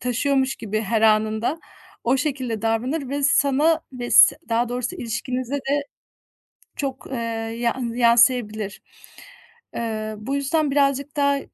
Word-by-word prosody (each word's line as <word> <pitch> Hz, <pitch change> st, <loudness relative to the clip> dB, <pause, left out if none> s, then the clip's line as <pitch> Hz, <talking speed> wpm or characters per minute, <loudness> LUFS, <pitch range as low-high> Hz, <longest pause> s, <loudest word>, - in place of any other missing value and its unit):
taşıyormuş 265 Hz, +2 st, 0 dB
gibi 215 Hz, 0 st, -3 dB
her 220 Hz, +1 st, 0 dB
anında, 220 Hz, +6 st, +2 dB, 0.5 s
o 245 Hz, +3 st, +3 dB
şekilde 255 Hz, -6 st, -2 dB
davranır 250 Hz, +6 st, -1 dB
ve 285 Hz, +2 st, -3 dB
sana 285 Hz, +3 st, +3 dB
ve 245 Hz, -1 st, -6 dB
s -, -, +7 dB
daha 235 Hz, +1 st, +1 dB
doğrusu 250 Hz, +8 st, -3 dB
ilişkinize 250 Hz, 0 st, -4 dB
de 285 Hz, +1 st, -1 dB, 0.9 s
çok, 275 Hz, -2 st, -4 dB
eee, -, -, -3 dB, 0.4 s
yan 235 Hz, 0 st, -1 dB
yansıyabilir. 235 Hz, -4 st, +2 dB, 0.9 s
Eee, 220 Hz, -2 st, -3 dB
bu 225 Hz, +7 st, -4 dB
yüzden 280 Hz, +1 st, 0 dB
birazcık 280 Hz, 0 st, +1 dB
daha 280 Hz, -1 st, +2 dB
250 Hz, 125 wpm, -22 LUFS, 230-280 Hz, 0.9 s, s